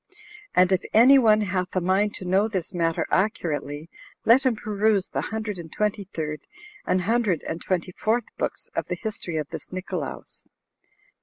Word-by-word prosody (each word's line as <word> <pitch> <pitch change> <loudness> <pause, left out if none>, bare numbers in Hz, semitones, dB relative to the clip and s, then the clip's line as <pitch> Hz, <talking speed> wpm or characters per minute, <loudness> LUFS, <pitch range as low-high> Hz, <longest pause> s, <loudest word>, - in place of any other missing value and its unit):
And 180 +1 +5
if 185 - +3
any 260 +5 +8
one 215 -3 +5
hath 185 -2 -2
a - - +3
mind 190 +4 +1
to 185 - -5
know 190 +4 +3
this 190 -4 -3
matter 165 -2 0
accurately, 160 -6 -1 0.4
let 260 +4 +6
him 245 - +2
peruse 210 -2 +1
the - - -2
hundred 215 -3 -4
and 160 -2 -9
twenty 210 -1 -1
third 155 -4 -4 0.5
and 185 - +2
hundred 215 -3 +1
and 165 - -4
twenty 180 -1 -1
fourth 225 +6 0
books - - -4
of - - -1
the - - -2
history 205 -7 -4
of 150 -2 -2
this - - -6
Nicolaus. 185 0 -5
190 Hz, 170 wpm, -25 LUFS, 175-215 Hz, 0.5 s, any